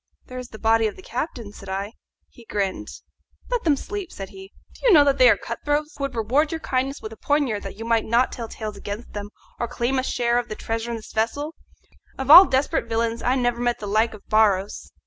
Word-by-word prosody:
"There 255 0 -8
is 250 - -7
the 220 - -10
body 225 0 +3
of 210 - -6
the 375 - -14
captain," 235 - -5
said 195 -2 -11
I. 195 +3 -3 0.3
He 240 - -17
grinned. 200 -3 -2 0.6
"Let - - 0
them 305 -3 +4
sleep," 395 +4 -6
said 195 -1 -7
he. 190 0 -12 0.2
"Do - - -2
you - - +7
know 300 -4 +8
that 280 -1 +1
they - - +8
are - - +5
cutthroats, 300 +1 -2
who 280 - -6
would 275 - -6
reward 255 +8 +1
your 325 - -3
kindness 270 -1 -2
with 220 - -6
the 225 - -11
poniard 280 -8 0
that 195 - -7
you 225 - -6
might 230 -1 +2
not 235 +3 +2
tell 230 -2 -6
tales 215 -2 -6
against 205 +4 -7
them 205 0 -6 0.3
or 235 - -1
claim 245 +2 -1
a - - -1
share 240 -2 +1
of 245 - -6
the 215 - -4
treasure 225 +2 -4
in 235 - -3
this 220 - -12
vessel? 285 +8 -1 0.6
Of 265 +1 +1
all 360 +5 +12
desperate 270 -3 0
villains 230 0 -1
I 250 +2 +1
never 245 -2 0
met 240 0 +1
the 210 - -7
like 215 +2 +1
of 205 - -17
Barros. 205 -2 +1
235 Hz, 240 wpm, -23 LUFS, 215-275 Hz, 0.6 s, all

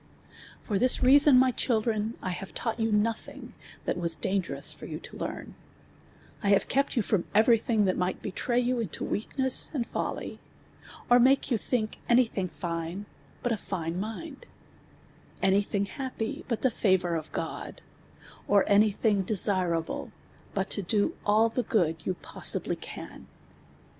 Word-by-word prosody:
b\)V 205 -4 0
this 255 +1 +3
reason, 280 +1 +7
my 255 0 +5
children, 225 -2 0
I 185 - -2
have 190 +2 -7
tnut; 230 -2 -2
ht - - -14
you 225 0 +1
no 210 +2 +3
ihin<>' 225 - -11 0.3
that - - -1
was 170 -1 +2
dangerous 190 0 -2
for - - -10
you - - -5
to - - -11
learn: - - -6 0.9
1 200 - +1
have 200 - +2
kej)t 275 +1 +1
you 230 - +2
IVom 195 -3 0
every 225 +2 +5
thiui; 220 -2 +1
that 185 -1 0
mi:;ht 180 +1 -1
betray 240 +4 -1
you 250 0 0
into 215 -8 -4
weakness 260 +5 +1
and 245 -4 0
lolly; - - -3 0.7
or 245 0 +6
make 265 +2 +3
you 235 - +3
think 220 -2 -2
any 245 0 +5
thinj; 190 -4 -3
line 170 +3 -3 0.4
but 245 - 0
a 220 - -1
line 170 -2 -2
mind; 245 +8 -7 0.9
any 195 +1 +3
thim; 200 0 -1
ha])py 250 -1 -5
but 230 -3 -2
the 260 - +2
favour 185 -5 +1
of 160 -1 -4
(joil; - - -5 0.7
or 200 -1 +4
any 210 +1 +5
thiuji;' 200 -1 +1
desirable 180 -5 +1 0.4
but 195 -1 -1
to 205 - +3
do 205 +2 +1
all 215 +2 +5
the 230 +2 -1
i;()od 165 -10 0
you 185 - 0
possibly - - -3
can. - - -9
215 Hz, 165 wpm, -28 LUFS, 190-240 Hz, 0.9 s, reason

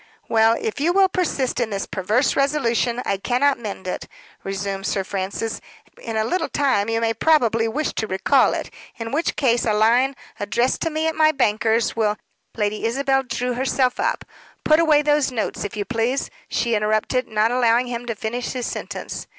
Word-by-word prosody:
"Well, 225 0 +4
if 445 -8 -3
you 330 +5 +2
will 385 0 +4
persist 305 -10 -1
in 240 -2 0
this 200 -2 -3
perverse 215 +8 0
resolution, 250 -4 +1
I 195 - 0
cannot 255 +6 +1
mend 200 -4 -6
it," 180 - -4 0.4
resumed 195 0 -3
Sir 195 - 0
Francis. 195 +4 -4 0.4
"In 225 -1 -4
a 220 - +2
little 365 +11 -1
time 260 -7 +1
you 225 0 +1
may 225 0 +1
probably 230 -7 +2
wish 295 +7 -2
to 220 - -2
recall 190 -1 +3
it; - - -5 0.3
in 230 -1 -5
which 315 +4 0
case 240 -4 +2
a 215 - +1
line, 240 +5 +3 0.2
addressed 235 +5 0
to 330 - 0
me 315 0 -2
at 320 - +1
my 310 -1 +4
banker's, 225 -4 +1
will 210 -2 +1 0.2
" - - -31
Lady 210 0 -1
Isabel 270 +3 +1
drew 250 0 -3
herself 255 0 0
up. - - -1 0.4
"Put 310 +1 +5
away 305 -3 +4
those 295 -2 +2
notes, 230 -4 -3
if 205 +1 -5
you 205 - -2
please," 245 +4 -1 0.2
she 235 -1 -1
interrupted, 215 +4 0
not 215 +1 +1
allowing 245 0 +3
him 240 -1 -5
to 230 - -2
finish 235 +3 -4
his 250 -2 -3
sentence. - - -5
235 Hz, 190 wpm, -22 LUFS, 215-270 Hz, 0.4 s, Put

